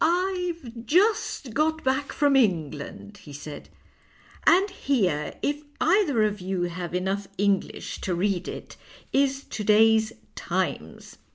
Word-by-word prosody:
" - - +4
I've 345 -9 -1
just 360 - +2
got 315 +4 +1
back 265 +2 0
from 285 -2 +2
England," 175 - -1
he 150 - -13
said, 145 +1 -9 0.4
" - - -24
and 380 +3 +6
here, 200 - 0
if 290 +1 0 0.2
either 325 - +3
of 210 -2 -1
you 185 -1 -2
have 175 0 -4
enough 195 +2 -1
English 200 -1 -1
to 180 - -1
read 185 0 0
it, - - -8 0.4
is 275 0 +2
to 215 - -5
day's 220 +1 +5 0.4
I'imes.'" - - -3
220 Hz, 140 wpm, -26 LUFS, 190-290 Hz, 0.4 s, and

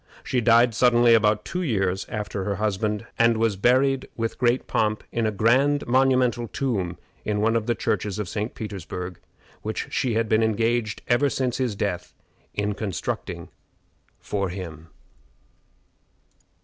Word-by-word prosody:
She 125 - 0
died 120 +1 +5
suddenly 120 0 +5
about 105 -2 +3
two 180 - -3
years 95 - 0
after 105 -2 -3
her 100 0 -1
husband, 105 +1 -1
and 115 -1 +4
was 110 -2 +1
buried 130 +6 +2
with 115 -1 -3
great 125 0 +2
pomp 110 -1 0
in 115 -1 0
a - - 0
grand 130 +8 +3
monumental 125 -2 +2
tomb 100 -10 -2 0.3
in 105 -1 -1
one 115 +2 +2
of 115 -1 0
the 120 - +1
churches 105 -2 -1
of 105 -3 -3
St. 105 +5 -4
Petersburg, 90 -4 -6 0.4
which - - -4
she 120 -4 0
had 115 0 +1
been 110 +1 +3
engaged 110 -1 0
ever 130 +4 +3
since 130 -2 -1
his 125 -5 -1
death 100 -3 -3 0.4
in 105 0 0
constructing 100 -4 -4 0.7
for 100 -2 -2
him. 85 -4 -7
110 Hz, 150 wpm, -24 LUFS, 105-120 Hz, 0.7 s, died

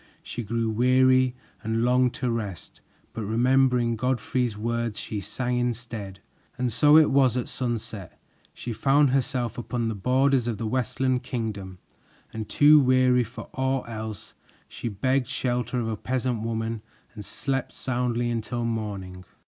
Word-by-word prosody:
She 120 - -5
grew 115 +1 -1
weary 130 +2 +3 0.3
and 110 +1 0
longed 125 0 +3
to 125 -2 -1
rest, 105 -8 -5 0.3
but 115 - -4
remembering 120 +2 +2
Godfrey's 125 -1 -1
words, 115 0 -2
she 105 -2 -4
sang 125 +5 -2
instead. 115 -5 -4 0.4
And 125 -2 -1
so 150 +5 +6
it 155 -2 +6
was 130 -3 +4
at 125 - -2
sunset 115 -6 -4 0.3
she 120 - -6
found 140 +3 +3
herself 125 -3 -1
upon 120 -1 -2
the - - -2
borders 130 +4 +2
of 115 -3 -2
the 115 - -4
Westland 125 +2 0
Kingdom, 100 -6 -4 0.6
and 110 -1 -5
too 150 +1 +7
weary 130 -2 +4
for 115 +2 -10
aught 130 -1 -1
else, 110 -3 -7 0.3
she 120 - -5
begged 130 +5 0
shelter 125 -1 -1
of 115 - -2
a 110 - -1
peasant 125 0 -2
woman 115 0 -3 0.3
and 105 - -8
slept 135 +6 -3
soundly 120 -1 -1
until 120 +1 -2
morning. 100 -5 -4
120 Hz, 150 wpm, -26 LUFS, 110-130 Hz, 0.6 s, too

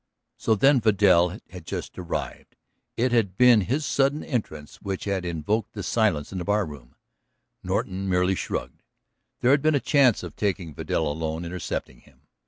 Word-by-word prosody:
So 110 - +1
then 135 +4 +4
Vidal 95 -4 +4
had 90 -3 -9
just - - -6
arrived, 90 -2 -5 0.4
it 125 +2 +1
had 105 -6 +1
been 125 -3 +6
his 135 - -1
sudden 140 +2 +1
entrance 80 - -4
which 95 -2 -5
had 100 -3 -2
invoked 90 +6 -2
the 100 - -5
silence 95 -8 0
in 95 - -4
the - - -3
barroom. 80 -12 -2 0.7
Norton 95 +1 -2
merely 90 +1 +2
shrugged; - - -4 0.6
there 125 - +4
had 140 0 +4
been 155 +1 +3
a - - +3
chance 140 -3 +3
of - - -8
taking 95 -6 -2
Vidal 80 +2 -1
alone, 80 +2 -3
intercepting 90 +1 -5
him. - - -24
100 Hz, 165 wpm, -25 LUFS, 90-120 Hz, 0.7 s, been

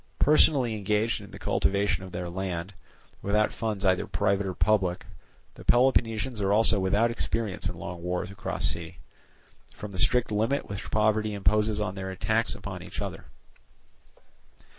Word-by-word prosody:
Personally 140 -5 +4
engaged 105 +2 0
in 100 - -11
the - - -10
cultivation 100 -1 0
of 95 - -9
their 90 0 -4
land, 90 +1 -4 0.5
without 105 +2 +1
funds 105 -3 -3
either 95 -1 +2
private 100 0 0
or 90 - -4
public, 95 -4 +1 0.5
the - - -13
Peloponnesians 120 -2 +2
are 100 0 +1
also 110 0 +4
without 100 +5 +2
experience 110 -4 -2
in - - -7
long 85 -1 -7
wars 90 +2 -3
across 95 -1 -3
sea, 85 +1 -2 0.8
from 105 - -7
the 95 - -6
strict 125 +4 +2
limit 115 +7 0
which 100 0 -6
poverty 110 0 +1
imposes 105 +2 +2
on 105 -3 -2
their 95 -1 -5
attacks 110 +4 0
upon - - -7
each - - -7
other. - - -5
105 Hz, 155 wpm, -27 LUFS, 95-110 Hz, 0.8 s, Personally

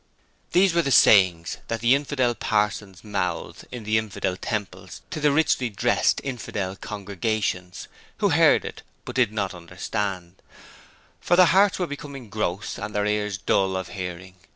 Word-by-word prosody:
"' - - -39
These 185 0 +4
were 170 - +3
the 140 - -2
sayings 95 -9 +5
that 115 - -2
the 120 +2 +4
infidel 140 -3 +1
parsons 105 -3 -1
mouthed 95 -5 -4
in 125 -3 -7
the 110 +1 +2
infidel 105 -4 -3
temples 105 +1 -5
to - - -4
the 150 -1 +3
richly 140 -4 +2
dressed 100 - +1
infidel 105 -7 -4
congregations, 100 -2 -3 0.3
who - - +2
heard - - +3 0.2
but - - -7
did 125 -5 +3
not 100 -3 -2
understand, 90 +1 -5 0.8
for 175 - +2
their 185 0 +7
hearts 195 +3 +4
were 180 - 0
become 140 -5 -8
gross 100 -2 -3
and 105 +1 -6
their 105 0 +1
ears 105 -1 -1
dull 95 0 +1
of 95 -2 -5
hearing. 90 -1 -7
105 Hz, 155 wpm, -24 LUFS, 95-125 Hz, 0.8 s, their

